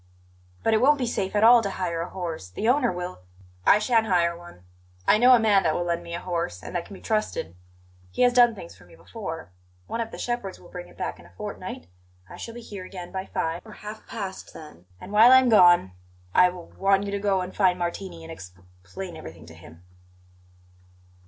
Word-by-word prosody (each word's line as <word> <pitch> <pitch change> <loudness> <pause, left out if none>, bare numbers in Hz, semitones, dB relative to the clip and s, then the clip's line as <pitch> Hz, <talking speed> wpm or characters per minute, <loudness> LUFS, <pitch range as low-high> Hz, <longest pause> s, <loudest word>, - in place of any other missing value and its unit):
"But 225 - +2
it 220 - +3
won't 290 +3 +5
be 255 - -1
safe 200 -4 -2
at 210 - +3
all 235 +1 +8
to 200 - -2
hire 170 -3 -3
a 170 - -5
horse. 165 - -6
The 95 - -3
owner 250 -1 +3
will 180 - -6 0.2
" 90 0 -27
"I - - +8
shan't 225 +1 +2
hire 170 -3 +2
one. 170 - -14 0.4
I 215 - +5
know 250 +2 +7
a - - +3
man 210 -3 +4
that 155 -3 +1
will 175 - -1
lend 170 0 -1
me 170 0 -6
a - - -4
horse, 170 - -3
and - - -8
that 175 - -2
can 200 - -10
be - - -13
trusted. 215 - -2 0.5
He 90 - 0
has 245 0 +4
done 240 -2 +5
things 170 - -10
for 90 - -18
me 90 - -18
before. 160 - -8 0.3
One 230 - -3
of 225 - -4
the - - -9
shepherds 240 -6 -4
will 175 - -16
bring 180 0 -8
it - - -19
back - - -4
in 85 - -15
a 85 - -22
fortnight. - - -7 0.4
I - - -11
shall 230 - -8
be 240 - -8
here 205 -4 -8
again 180 -1 -9
by 190 0 -5
five 165 +1 -2
or 220 - -12
half 210 +1 -10
past, 195 -4 -7
then; 120 - -13
and 185 - -10
while 220 +4 +7
I 260 - +10
am 260 -1 +4
gone, 175 - +6 0.4
I 180 - +6
w 180 -1 -9
want 195 0 +3
you 200 - -4
to 200 - -2
go 195 -2 +1
and 180 +1 -7
find 185 -3 +3
Martini 175 -1 -5
and 165 0 -8
exp 90 - -11 0.3
plain 175 - -8
everything 80 - -10
to 80 - -13
him." 80 +1 -15
185 Hz, 235 wpm, -25 LUFS, 165-215 Hz, 0.5 s, I